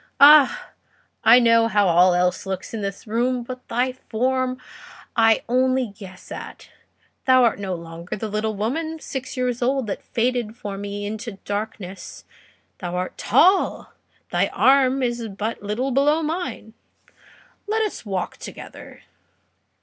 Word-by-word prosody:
Ah! 290 0 +7 0.5
I 230 +2 +8
know 230 -2 +4
how 205 -2 +2
all 175 +1 +5
else 180 +2 0
looks 190 +2 -5
in 225 - -4
this 200 +3 -5
room, 240 +3 0
but 255 +1 -9
thy 250 +2 0
form 255 +1 -1 0.6
I 225 -1 +4
only 255 -2 +1
guess 190 -3 -12
at. - - -9 0.6
Thou 255 -1 +5
art 230 -4 +2
no 190 -2 -3
longer 170 +1 -7
the 220 +2 -4
little 215 +1 -2
woman 315 +10 -3
six 270 -2 -6
years 250 -1 -1
old, 260 +1 +1
that 205 - -4
faded 235 -2 -2
for 205 -4 -6
me 205 +1 -5
into 220 +2 -5
darkness; 205 -2 -6 0.5
thou 180 -2 -4
art 180 +1 -3
tall, 375 +3 +2 0.3
and - - -46
thy - - +2
arm 265 0 +3
is 240 -2 -2
but 210 +3 -4
little 215 +7 -2
below 295 +5 +2
mine. 300 -9 -4 0.9
Let 440 +1 +1
us 425 - -4
walk 190 -4 -4
together." - - -11
230 Hz, 145 wpm, -22 LUFS, 205-255 Hz, 0.9 s, I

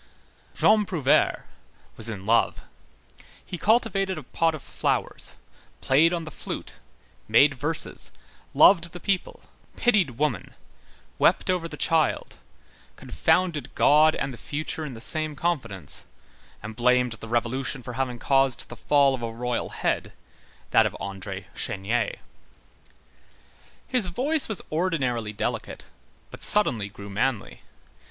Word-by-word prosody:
Jean 215 0 +4
Prouvaire 175 -10 +2 0.5
was 115 +1 -4
in 100 -3 -6
love; 115 +2 +2 0.8
he - - -6
cultivated 195 -1 +1
a - - -6
pot 165 -1 0
of 150 - -10
flowers, - - -2 0.4
played 155 +6 +4
on 170 -2 -2
the 155 - -8
flute, - - -7 0.5
made 140 +7 +5
verses, 150 +4 -1 0.5
loved 170 -3 +6
the 175 - -7
people, 195 0 -2 0.3
pitied 190 - +2
woman, 145 -7 -2 0.6
wept - - +3
over 175 -2 -1
the - - -9
child, 160 -2 +1 0.6
confounded 175 -5 0
God 155 +2 +5
and 135 -1 -3
the 120 - -11
future 155 +2 -4
in 140 -5 -6
the - - -9
same 155 +3 -1
confidence, 135 - -3 0.6
and 110 +1 -7
blamed 125 0 +3
the 115 0 -8
Revolution 120 +3 -1
for 125 - -7
having 125 -1 -2
caused 135 0 +2
the 120 - -8
fall 140 +3 +3
of 130 - -4
a 115 - -3
royal 120 +1 -2
head, - - -2 0.6
that - - +5
of - - -7
André 95 -1 -6
Chénier. 110 +1 -1 1.7
His 245 -7 +1
voice 270 - 0
was 215 - -3
ordinarily 135 -10 -1
delicate, 105 - -4 0.5
but - - -11
suddenly 120 - +2
grew 100 -1 -10
manly. 110 +2 -2
135 Hz, 130 wpm, -25 LUFS, 115-170 Hz, 1.7 s, loved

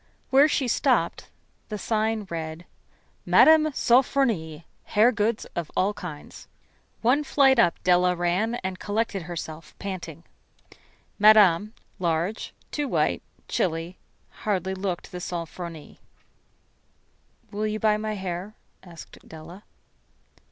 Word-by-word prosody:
Where 275 +3 +6
she 280 -3 0
stopped - - 0 0.4
the 210 - -4
sign 220 0 -1
read: 160 0 -5 0.6
"Mme. 315 -1 +6
Sofronie, 235 - +1 0.2
Hair 220 +4 +4
Goods 215 0 -1
of 170 -3 -3
All 195 +3 +2
Kinds." 165 -7 -9 0.6
One 260 +6 +3
flight 270 -3 +4
up 175 -7 +4
Della 180 0 +3
ran, 180 +7 0
and 185 0 -4
collected 210 -1 -2
herself, 165 -1 -8
panting. 175 -5 -7 1.0
Madame, 210 -1 +5 0.2
large, 175 +4 -1 0.2
too 295 -1 -2
white, - - 0 0.3
chilly, 165 +1 -2 0.4
hardly 190 -3 -1
looked 190 -2 -4
the 180 - -6
"Sofronie." 170 -2 -7 1.5
"Will 210 +1 -2
you 215 0 -3
buy 215 -1 +2
my 215 0 -3
hair?" 190 +1 -5 0.3
asked 170 -3 -13
Della. 165 +5 -12
190 Hz, 110 wpm, -25 LUFS, 170-220 Hz, 1.5 s, Where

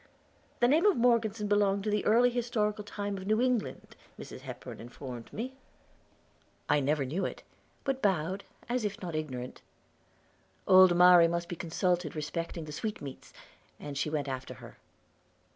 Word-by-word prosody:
The 240 - +6
name 320 +9 +4
of 405 - +3
Morgeson 230 -3 +2
belonged 200 -1 +2
to 210 - -1
the 210 -1 +1
early 240 +3 +5
historical 220 -3 -1
time 205 -1 -4
of 190 - -8
New 215 +1 +2
England, 250 -3 -1 0.2
Mrs. - - -9
Hepburn - - -9
informed 120 0 -9
me. 250 +5 -5 1.1
I 150 - +3
never 145 0 +1
knew 165 +9 -2
it; - - -4 0.4
but 270 -1 -1
bowed, 190 0 0 0.2
as 245 -1 -1
if 210 -1 -3
not 175 -3 -6
ignorant. 130 -5 -5 1.1
Old 185 -2 +7
Mari 180 -1 +8
must 170 0 -2
be 175 - -5
consulted 175 -1 -1
respecting 160 +2 -4
the 150 - -8
sweetmeats, 145 -5 -6 0.5
and 145 -1 -7
she 150 +2 -1
went 150 -2 -2
after 130 -1 -5
her. - - -13
190 Hz, 155 wpm, -30 LUFS, 155-215 Hz, 1.1 s, Mari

